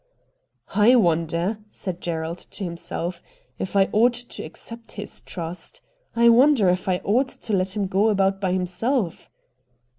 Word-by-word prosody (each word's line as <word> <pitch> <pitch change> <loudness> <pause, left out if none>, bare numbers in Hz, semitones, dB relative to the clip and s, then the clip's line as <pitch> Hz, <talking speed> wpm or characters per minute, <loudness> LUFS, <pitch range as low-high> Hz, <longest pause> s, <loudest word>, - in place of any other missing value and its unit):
' - - -25
I 250 - +8
wonder,' 170 0 +1
said 180 -4 -6
Gerald 165 0 -3
to 205 - -8
himself, 170 0 -4 0.2
' - - -38
if 190 - -4
I 195 -1 +5
ought 235 +3 +4
to 245 0 -7
accept 230 0 -10
this 205 - -7
trust. 170 0 -6 0.3
I 235 0 +5
wonder 245 -4 +5
if 180 +1 0
I 180 -1 +1
ought 250 +7 +2
to 220 - -5
let 190 0 0
him 205 -2 0
go 195 +3 +2
about 195 -1 +1
by 190 -2 +1
himself.' 185 +3 -1
195 Hz, 160 wpm, -24 LUFS, 175-230 Hz, 0.3 s, I